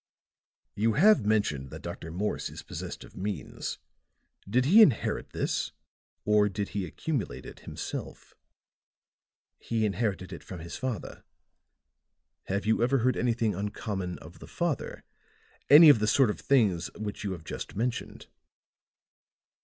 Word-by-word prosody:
"You 110 +2 +1
have 170 - +5
mentioned 75 -12 +1
that - - -9
Dr. 80 - -6
Morse 100 +6 -2
is - - -9
possessed - - -7
of - - -15
means. 95 -7 -4 0.7
Did 125 +5 +2
he 200 +10 +7
inherit 140 - +3
this, - - -2 0.5
or 105 -1 +4
did 100 +1 -3
he 100 -3 -3
accumulate 115 - -3
it - - -10
himself?" - - -7 1.3
"He 115 -2 -1
inherited 100 -3 -2
it - - -9
from 95 - -8
his 85 +1 -7
father." 130 -8 -5 1.2
"Have 100 +2 -2
you 110 +1 +2
ever 125 +3 +3
heard 130 +1 +2
anything 115 -3 +1
uncommon 100 -2 -4
of 85 +3 -13
the - - -11
father? 170 -6 -3 0.7
Any 155 +3 +10
of 145 -7 +8
the 105 - +1
sort 125 0 +4
of - - -8
things 105 -11 +2
which 105 -2 -5
you 100 -2 -2
have 85 -4 -9
just - - -7
mentioned?" 120 +3 -3
105 Hz, 140 wpm, -28 LUFS, 95-125 Hz, 1.3 s, Any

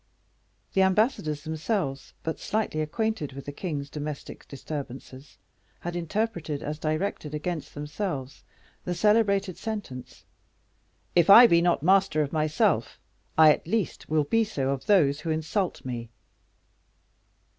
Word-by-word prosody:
The 190 - +3
ambassadors 190 - +1
themselves, 160 -3 -3
but 160 - -3
slightly 210 -8 -1
acquainted 165 -1 -2
with 140 +1 -9
the 145 - -5
king's 145 -2 -4
domestic 150 0 -7
disturbances, 135 -1 -8 0.4
had 175 0 -4
interpreted 170 -4 -2
as 150 +1 -4
directed 155 -1 -2
against 160 +1 -4
themselves 145 -2 -5 0.4
the 180 - -3
celebrated 200 -3 +2
sentence: 205 - -6 0.9
"If 175 0 +4
I 230 +5 +11
be 170 -7 +5
not 170 -4 +2
master 190 -3 +4
of 145 - -6
myself, 155 -1 +1 0.4
I, 155 -1 +8
at - - -8
least, 215 -1 -2
will 155 -1 +2
be 225 +10 +2
so 140 -11 -2
of 140 +5 -4
those 150 -9 +4
who 160 - -5
insult 160 +4 -2
me." 120 -2 -5
160 Hz, 130 wpm, -27 LUFS, 145-195 Hz, 0.9 s, I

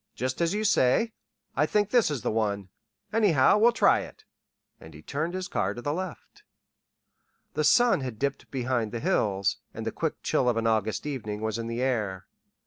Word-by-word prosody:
"Just 130 +5 -3
as 170 +3 +1
you 215 - -1
say. 215 - +3 0.4
I 150 +3 +2
think 205 +2 +1
this 240 -7 +4
is 145 -5 -3
the - - 0
one. 100 -3 -1 0.4
Anyhow, 200 -6 +4
we'll 235 +3 +6
try - - +4
it." - - -10 0.5
And 80 -1 -13
he 75 - -13
turned 160 - -3
his 185 -1 -3
car 100 +1 -1
to 120 - -7
the 145 - -1
left. 185 0 -7 1.1
The 155 - 0
sun 240 +9 +5
had 125 -4 -5
dipped 140 +3 -3
behind 125 -4 -1
the 120 - -4
hills, 100 -4 +1 0.2
and - - -5
the - - -1
quick - - -3
chill 125 - +2
of 120 - 0
an 115 - -1
August 110 +1 0
evening 110 -8 -4
was 110 +1 -2
in 115 - -4
the 115 +2 -2
air. 105 -8 -1
130 Hz, 195 wpm, -27 LUFS, 110-170 Hz, 1.1 s, we'll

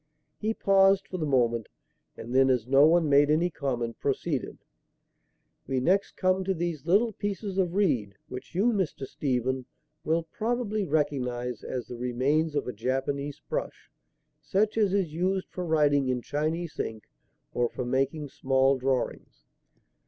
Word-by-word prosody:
He 220 +1 -1
paused 195 0 +4
for 185 - -5
the 155 - -1
moment, 120 -5 +1 0.5
and 115 +2 -7
then, 135 0 +5
as 125 -4 +2
no 135 +3 +6
one 165 0 +4
made 145 0 +5
any 165 +4 +2
comment, 120 -6 -3
proceeded: 140 0 -2 1.1
"We 135 -1 0
next 190 +10 +1
come 185 0 +2
to 190 0 0
these 165 -3 -3
little 215 +6 +3
pieces 200 -1 -3
of 180 -1 0
reed, 130 - +1
which 125 +6 -9
you, 225 +6 +3
Mr. 180 -9 -2
Stephen, 130 -1 -2 0.4
will 165 +1 +1
probably 215 +3 -2
recognize 125 - -1
as 125 -2 -4
the 120 - -8
remains 135 +6 0
of 145 - 0
a 125 - -3
Japanese 135 +5 -2
brush, - - -4 0.5
such 195 +9 +1
as 210 -4 +2
is 190 -6 0
used 185 +3 -1
for 180 - -4
writing 145 -4 +3
in 125 -1 -1
Chinese 155 +3 -2
ink 110 -1 -3 0.5
or 120 -1 +1
for 125 - -5
making 135 +4 -1
small 135 0 +2
drawings." 130 -1 -2
145 Hz, 150 wpm, -28 LUFS, 130-185 Hz, 1.1 s, no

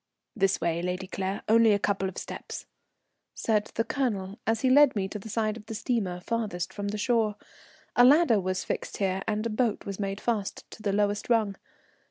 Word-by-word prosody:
"This 195 -3 +2
way, 170 0 0
Lady 180 +2 -2
Claire, 190 +1 -3
only 225 0 +6
a - - +4
couple 195 -1 0
of 185 - -11
steps," - - -6 0.7
said 210 -2 +1
the 230 - +2
Colonel 225 -5 -2
as 225 0 +1
he 260 - +3
led 285 -1 +6
me 195 -2 0
to 210 +2 -6
the 220 - -9
side 215 0 0
of 210 - -13
the 225 - -5
steamer 210 -7 -1
farthest 210 -4 -2
from 205 0 -4
the 210 +1 -2
shore. 220 -1 +1 0.6
A 245 - +7
ladder 270 -4 +6
was 185 0 -2
fixed - - -4
here 190 -1 0
and 215 +1 -1
a - - 0
boat 220 -1 0
was 200 0 -5
made 195 0 -2
fast 215 -4 -2
to - - -11
the 205 - 0
lowest 205 +1 0
rung. 220 -4 +2
210 Hz, 205 wpm, -28 LUFS, 195-230 Hz, 0.7 s, A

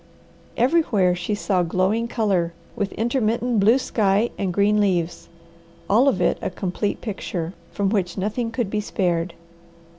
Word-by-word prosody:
Everywhere 240 - +3
she 180 +4 -2
saw 195 -3 0
glowing 185 +7 +1
colour, 195 -8 0 0.2
with 205 -4 -2
intermittent 235 0 0
blue 220 +6 +5
sky 215 -3 +1
and 190 -2 -2
green 205 +3 +3
leaves, 175 -4 -1 0.6
all 235 +7 +4
of 230 -9 +2
it - - +1
a - - -1
complete 185 +2 -3
picture, 185 -5 -4 0.2
from 200 -2 0
which 185 -5 -1
nothing 215 +5 -1
could 225 -3 -2
be 210 - 0
spared. 175 -4 -1
205 Hz, 145 wpm, -23 LUFS, 185-230 Hz, 0.6 s, blue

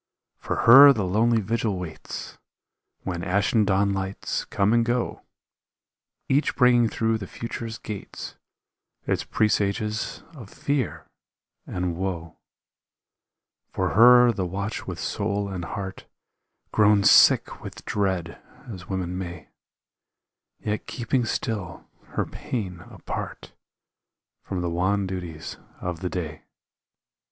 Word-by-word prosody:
For - - -3
her 140 +4 +10
the 105 -6 -1
lonely 110 +5 +2
vigil 110 -1 -1
waits 90 -3 -7 0.6
When 85 -2 -4
ashen 100 +5 +2
dawnlights 95 -1 -1
come 100 +3 +2
and 120 0 +4
go, 120 +1 -1 1.1
Each 140 +3 +1
bringing 120 -3 +4
through 110 0 0
the 100 - -7
future's 115 +1 -6
gates 105 -3 -7 0.7
Its - - 0
presages 105 0 -1
of 120 -10 -11
fear 130 - -2 0.6
and 90 -1 -2
woe; 85 -3 -4 1.3
For - - -1
her 120 +1 +7
the 95 -5 -2
watch 100 +4 -4
with - - -5
soul 100 -1 -2
and 95 -3 -5
heart 95 +3 -6 0.6
Grown 105 -1 +4
sick - - +5
with - - -9
dread, 95 -5 -2 0.3
as 95 -7 -9
women 90 -2 -3
may, 85 -2 -7 1.1
Yet 105 0 -4
keeping 125 0 -1
still 105 -6 -4 0.3
her - - +1
pain 95 -8 -5
apart - - -7 0.9
From 95 -2 -4
the 85 - -1
wan 95 +4 +1
duties 90 -4 -6 0.2
of 90 -2 -4
the 90 - -3
day. 80 -4 -5
100 Hz, 115 wpm, -25 LUFS, 90-115 Hz, 1.3 s, her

